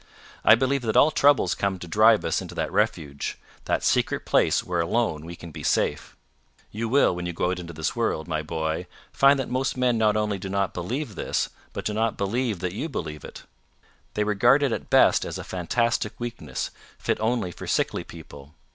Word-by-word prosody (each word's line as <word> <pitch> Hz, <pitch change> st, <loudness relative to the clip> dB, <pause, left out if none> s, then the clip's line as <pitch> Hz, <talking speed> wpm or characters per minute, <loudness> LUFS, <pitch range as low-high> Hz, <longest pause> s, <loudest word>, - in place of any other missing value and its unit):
I 110 Hz, -, +8 dB
believe 130 Hz, +3 st, 0 dB
that 110 Hz, -2 st, 0 dB
all 155 Hz, -, +6 dB
troubles 145 Hz, -2 st, +4 dB
come 100 Hz, -1 st, -1 dB
to 90 Hz, -, -9 dB
drive 110 Hz, +4 st, +4 dB
us 80 Hz, -, 0 dB
into -, -, -9 dB
that -, -, -2 dB
refuge 70 Hz, -2 st, -1 dB, 0.3 s
that -, -, 0 dB
secret -, -, +1 dB
place -, -, +3 dB
where 90 Hz, -1 st, -2 dB
alone 85 Hz, -4 st, -1 dB
we 85 Hz, +1 st, -7 dB
can 85 Hz, -1 st, -10 dB
be -, -, -8 dB
safe. 75 Hz, 0 st, -1 dB, 0.5 s
You 115 Hz, +2 st, -3 dB
will, 135 Hz, -7 st, +4 dB
when 90 Hz, 0 st, -4 dB
you 85 Hz, -, -4 dB
go 90 Hz, +2 st, 0 dB
out 90 Hz, -, -3 dB
into 85 Hz, -1 st, -7 dB
the 80 Hz, -2 st, -3 dB
world, 80 Hz, -, -1 dB
my 80 Hz, -2 st, -1 dB
boy, 80 Hz, +2 st, -3 dB, 0.3 s
find 140 Hz, +1 st, +5 dB
that 135 Hz, -, -2 dB
most 130 Hz, +1 st, -1 dB
men 125 Hz, -2 st, +2 dB
not 110 Hz, -1 st, +3 dB
only 105 Hz, -2 st, -1 dB
do 95 Hz, -, -6 dB
not 100 Hz, -1 st, -1 dB
believe 115 Hz, -, -4 dB
this, -, -, -1 dB, 0.2 s
but -, -, -6 dB
do 105 Hz, -, -1 dB
not 110 Hz, +1 st, 0 dB
believe 105 Hz, -1 st, -1 dB
that 90 Hz, -1 st, -2 dB
you 150 Hz, +11 st, -4 dB
believe 75 Hz, -, -5 dB
it. -, -, -10 dB, 0.7 s
They 105 Hz, -, +1 dB
regard 120 Hz, +7 st, +4 dB
it 140 Hz, -, +1 dB
at -, -, -4 dB
best -, -, +5 dB
as -, -, -5 dB
a -, -, -6 dB
fantastic 115 Hz, +7 st, -1 dB
weakness, 120 Hz, -1 st, -5 dB, 0.3 s
fit -, -, -1 dB
only 110 Hz, -4 st, 0 dB
for -, -, -9 dB
sickly -, -, 0 dB
people. 70 Hz, +2 st, -13 dB
105 Hz, 205 wpm, -25 LUFS, 85-120 Hz, 0.7 s, I